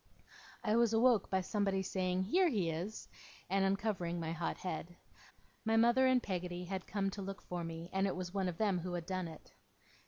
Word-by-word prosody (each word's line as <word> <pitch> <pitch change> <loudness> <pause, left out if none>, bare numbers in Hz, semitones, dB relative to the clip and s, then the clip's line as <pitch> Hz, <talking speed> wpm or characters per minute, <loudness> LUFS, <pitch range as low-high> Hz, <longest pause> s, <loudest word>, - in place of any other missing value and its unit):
I 215 0 +2
was 235 -1 +4
awoke 230 -2 +4
by 190 0 +2
somebody 195 -1 0
saying 185 0 0
'Here 355 - +3
he 190 - +1
is!' 180 +7 -5 0.4
and 195 0 +3
uncovering 195 -3 0
my 165 -1 -2
hot 165 0 -2
head. 175 -1 -5 0.7
My 225 0 +2
mother 240 +3 +5
and 255 -1 +4
Peggotty 180 -2 -3
had 190 0 -4
come 195 -1 0
to 200 - -6
look 195 +1 -6
for 175 -1 -4
me, 165 0 -5
and 195 +1 +2
it 190 - -1
was 180 0 -5
one 190 -2 0
of 170 - -6
them 200 -4 +2
who 175 +1 -4
had 175 -2 -3
done 185 -1 -2
it. 160 -2 -12
190 Hz, 205 wpm, -35 LUFS, 175-210 Hz, 0.7 s, mother